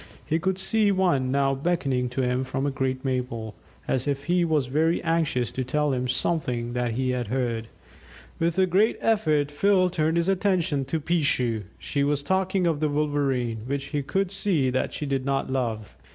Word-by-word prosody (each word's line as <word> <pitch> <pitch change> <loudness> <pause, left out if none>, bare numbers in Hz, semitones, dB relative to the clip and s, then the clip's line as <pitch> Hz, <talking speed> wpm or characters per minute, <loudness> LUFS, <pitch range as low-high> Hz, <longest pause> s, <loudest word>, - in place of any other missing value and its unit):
He 160 - 0
could 190 +2 0
see 210 +2 +2
one 175 -9 +2
now 135 0 +2
beckoning 135 -4 0
to 130 +2 -2
him 125 +1 0
from 135 +1 -2
a 145 - 0
great 130 0 -2
maple, 125 -4 -2 0.3
as 130 - 0
if 140 -1 -1
he 175 +2 +2
was 155 -5 +1
very 155 +6 +1
anxious 155 -8 0
to 130 - -3
tell 150 +2 0
him 125 0 -1
something 125 -3 0
that 120 -1 -1
he 130 +2 0
had 125 -2 -2
heard. 115 -2 -2 0.7
With 165 +1 0
a 190 - +5
great 195 +5 +2
effort 155 -10 +1
Phil 185 +3 +3
turned 160 -1 +1
his 170 +1 +1
attention 185 -7 +1
to 160 +5 -2
"Peeshoo"; 140 - +1
she 140 - -1
was 145 0 0
talking 190 +2 +1
of 165 -3 +1
the 155 -1 +1
Wolverene, 140 -6 0
which 140 0 -3
he 145 - +1
could 190 +7 -1
see 170 -10 +1
that 130 - -1
she 150 - -4
did 135 -2 -1
not 135 0 -1
love. 115 - -2
140 Hz, 190 wpm, -25 LUFS, 130-170 Hz, 0.7 s, a